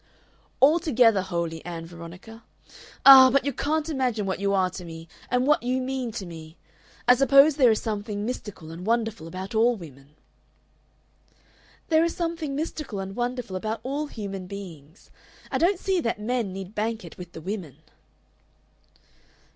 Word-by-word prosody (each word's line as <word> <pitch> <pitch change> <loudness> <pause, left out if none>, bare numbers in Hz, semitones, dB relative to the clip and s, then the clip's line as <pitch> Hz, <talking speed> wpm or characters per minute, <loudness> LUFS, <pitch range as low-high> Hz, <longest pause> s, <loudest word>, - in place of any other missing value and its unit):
"Altogether 265 - +4
holy, 170 -3 -3
Ann 165 -1 -6
Veronica. 175 +7 -11 0.6
Ah! 265 -1 +11
but 275 +1 +2
you 280 - -1
can't 305 +4 -1
imagine 255 -8 -1
what 190 -1 -2
you 200 0 0
are 190 -2 +2
to 185 - -8
me 165 -1 -9 0.2
and 250 +1 +1
what 300 +2 +3
you 255 +2 0
mean 260 -2 -3
to 210 -4 -5
me! 160 -1 -11 0.5
I 250 - +9
suppose 275 +3 +5
there 260 -5 +5
is 220 - +2
something 210 -1 -3
mystical 210 -9 -6
and 170 +2 -8
wonderful 225 -5 -1
about 185 +4 -7
all 235 +2 +3
women." 145 - -13 1.7
"There 320 0 +4
is 335 - -1
something 330 -4 -3
mystical 300 -6 -4
and 195 0 -6
wonderful 245 -4 -3
about 215 +4 -3
all 285 +4 -3
human 195 -7 -6
beings. 175 -5 -11 0.4
I - - 0
don't 360 +3 +3
see 380 0 0
that 230 -5 -2
men 225 -2 -1
need 190 +1 -7
bank 220 +1 -2
it - - -12
with 175 -1 -9
the 160 - -8
women." 175 - -6
220 Hz, 160 wpm, -25 LUFS, 185-260 Hz, 1.7 s, Ah